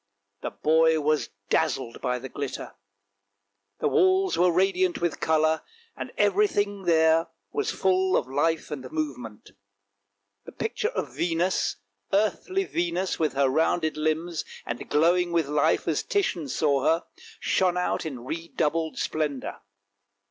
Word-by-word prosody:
The - - -3
boy 160 +1 +3
was 155 0 +1 0.2
dazzled 130 -6 0
by 125 -1 0
the 130 +2 -7
glitter; 140 0 -5 1.1
the - - +2
walls 380 -2 +3
were 180 +1 +4
radiant 185 0 +2
with 170 -2 -1
colour, 160 0 +2 0.3
and - - -6
everything 205 - +1
there 160 -1 +4 0.2
was 430 0 -1
full 190 - +2
of - - -1
life 155 +4 0
and 130 -3 -6
movement. 125 -9 -5 0.9
The - - -10
picture - - -2
of 130 - -4
Venus, 170 +3 0 0.3
the 195 - +3
earthly 370 - 0
Venus 175 - -1
with 155 -2 +1
her 135 0 +3
rounded 160 +3 +1
limbs 155 +2 -1 0.2
and 120 0 -5
glowing 175 +3 +3
with 165 -4 +1
life 150 +1 +1
as - - +1
Titian 190 - -1
saw 140 0 +1
her, 165 +3 +2 0.4
shone 180 -1 +1
out 180 - 0
in 130 -7 -6
redoubled 165 +1 -2
splendour. 150 -4 -2
160 Hz, 135 wpm, -26 LUFS, 150-180 Hz, 1.1 s, were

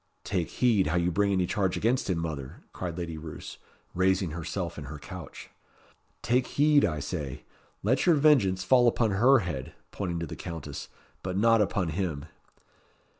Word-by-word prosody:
"Take 90 -4 -1
heed 110 -8 +2
how 80 - 0
you 90 0 +2
bring 100 +3 +2
any 95 -2 +2
charge 95 0 0
against 120 0 +1
him, 90 - +1
mother," 75 -5 -5
cried 90 -2 -5
Lady 85 -3 -4
Roos, 80 0 -9 0.3
raising 95 -1 +1
herself 85 +1 -4
in 75 - -7
her 75 +3 -7
couch. 85 0 -10 0.7
"Take 125 +1 +2
heed, 145 0 +4
I 75 -3 0
say. 75 -3 -5 0.4
Let 130 - +2
your 170 - +6
vengeance 130 -12 +4
fall 120 +6 +5
upon 115 -2 +2
her 120 +6 +5
head," 70 -8 -5 0.2
pointing 90 -4 -3
to 85 - -3
the - - -7
Countess 80 -3 -7 0.3
"but 95 0 -3
not 115 +1 +4
upon 95 -4 0
him." 80 -4 -3
90 Hz, 170 wpm, -28 LUFS, 80-110 Hz, 0.7 s, your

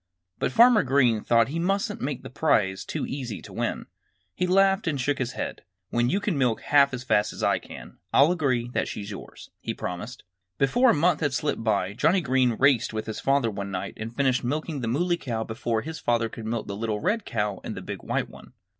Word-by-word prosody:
But - - 0
Farmer 235 - +6
Green 125 -5 +2
thought 115 -1 +4
that 135 - -8
he 165 - -1
mustn't 195 +4 -1
make 140 0 -3
the - - -9
prize 105 -10 +1
too - - -3
easy 125 -6 -5
to - - -11
win. - - -2 0.5
He 180 - -1
laughed 195 +1 +3
and 145 -4 0
shook 140 +2 0
his 125 -2 -2
head. - - -5 0.3
"When 120 +1 +2
you 195 - +1
can 200 -8 -1
milk 125 -4 +1
half 140 -1 +4
as 125 -1 -5
fast 105 -5 +2
as - - -7
I - - +2
can, - - -12
I'll 145 +5 +5
agree 130 -9 0
that - - -1
she's 100 0 -6
yours," 100 - -10
he - - -4
promised. 95 +8 -6 0.3
Before 245 - +4
a - - +6
month 160 +1 +2
had 145 -4 0
slipped 145 -5 -1
by 100 -3 0
Johnnie 165 - +3
Green 130 -4 +2
raced 135 -5 +3
with 110 0 -3
his 110 - -5
father 135 -4 +2
one 100 -1 -5
night 90 -2 -4
and 115 +2 -7
finished 130 -3 +1
milking 150 +3 -2
the 115 - -2
Muley 175 +9 +1
Cow 115 -8 -3
before 110 0 -2
his 160 +1 -6
father 115 -1 +1
could 110 0 -8
milk 115 -1 -2
the 100 - -5
little 110 0 -2
red 210 - 0
cow 105 - -2
and - - -5
the - - -6
big - - -6
white - - -1
one. - - -15
130 Hz, 225 wpm, -26 LUFS, 115-155 Hz, 0.5 s, Farmer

